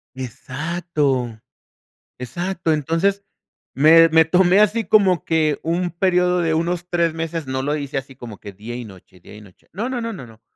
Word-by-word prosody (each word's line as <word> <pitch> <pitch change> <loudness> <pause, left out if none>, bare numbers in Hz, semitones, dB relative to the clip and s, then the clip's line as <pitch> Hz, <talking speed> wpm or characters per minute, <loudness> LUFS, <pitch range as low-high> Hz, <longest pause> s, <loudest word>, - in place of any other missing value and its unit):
Exacto. 130 -2 -3 0.8
Exacto. 170 +7 -3
Entonces, 165 +7 0 0.5
me 165 +4 +7
me 160 0 +5
tomé 180 +3 +4
así 210 +1 +2
como 190 -3 +3
que 155 -3 +1
un 175 +2 -1
periodo 180 0 +1
de 160 -1 0
unos 175 +2 -1
3 170 -2 +1
meses, 165 -1 -4
no 130 0 -2
lo 145 +2 -1
hice 140 -2 -4
así 135 0 -6
como 115 -5 -10
que 100 - -10
día 110 +5 -8
y 120 -2 -6
noche, 95 -2 -16
día 95 - -14
y 105 - -12
noche. 95 -4 -20
No, 225 +7 -3
no, 250 -2 -3
no, 230 -1 -4
no, 130 -10 -9
no. 110 -1 -17
160 Hz, 180 wpm, -20 LUFS, 130-180 Hz, 0.8 s, me